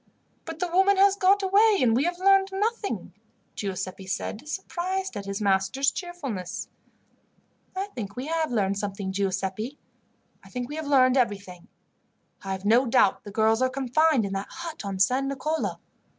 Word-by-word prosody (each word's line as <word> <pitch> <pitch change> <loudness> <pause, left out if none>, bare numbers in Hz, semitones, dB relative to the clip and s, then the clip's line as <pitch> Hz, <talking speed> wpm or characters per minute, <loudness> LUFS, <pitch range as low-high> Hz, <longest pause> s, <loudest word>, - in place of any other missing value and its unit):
"But 330 -1 -6
the 360 - -1
woman 380 +3 +3
has 395 0 +5
got 400 0 +3
away 405 +2 +4
and 230 -3 +3
we 265 +5 +2
have 350 0 -1
learned 390 +1 +4
nothing," 420 +2 -2 0.4
Giuseppi 190 -1 -5
said, 215 +7 -4
surprised 380 0 -3
at 200 -1 -6
his 200 +1 -3
master's 195 +7 +2
cheerfulness. 275 - -5 1.1
"I 380 +1 -1
think 200 -4 -6
we 255 - -4
have 320 -1 -1
learned 200 -3 0
something, 200 -1 -4
Giuseppi. 195 +6 -2 0.7
I - - -15
think 250 0 -5
we 295 - -5
have 315 -2 -4
learned 260 -2 +4
everything. 200 -7 -2 0.8
I 195 -1 -3
have 190 +1 -6
no 240 +5 +4
doubt 230 -5 +3
the - - -7
girls 220 +3 +2
are 255 - +3
confined 270 0 +2
in 195 - -4
that 195 0 -4
hut 330 -6 -7
on 195 -1 -4
San 255 +8 +2
Nicolo. 305 +4 -2
255 Hz, 165 wpm, -26 LUFS, -, 1.1 s, has